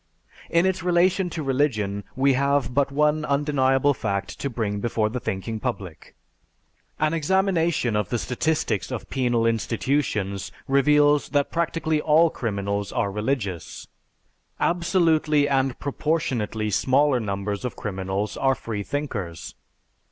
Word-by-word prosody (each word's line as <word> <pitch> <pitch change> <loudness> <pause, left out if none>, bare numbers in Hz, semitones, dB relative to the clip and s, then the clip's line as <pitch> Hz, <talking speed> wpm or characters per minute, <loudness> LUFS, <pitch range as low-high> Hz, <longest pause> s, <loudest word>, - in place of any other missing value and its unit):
In 170 +2 +3
its 190 0 0
relation 180 +1 +2
to 160 -2 -4
religion, 115 -8 0
we 135 +1 +3
have 140 -2 +1
but 140 +1 +1
one 150 +2 +2
undeniable 140 -1 +2
fact 100 -5 -3
to 140 - -2
bring 110 -4 -2
before 110 -1 0
the 125 +3 -3
thinking 110 +2 -4
public. 100 -9 -6 0.8
An 155 +1 +1
examination 165 - +1
of 105 -2 0
the 120 - 0
statistics 155 +7 -1
of 125 -4 -6
penal 120 -3 +1
institutions 115 -3 -1 0.2
reveals 145 +1 +4
that 140 - 0
practically 165 -2 0
all 160 +2 +4
criminals 100 -2 -3
are 100 - -1
religious. 105 - -3 0.7
_Absolutely 165 -4 +2
and 135 -2 +1
proportionately 130 -8 -1
smaller 130 +6 +3
numbers 100 -1 -3
of 125 - -4
criminals 95 -1 -3
are 135 0 +2
freethinkers. 105 - -4
135 Hz, 120 wpm, -24 LUFS, 105-150 Hz, 0.8 s, reveals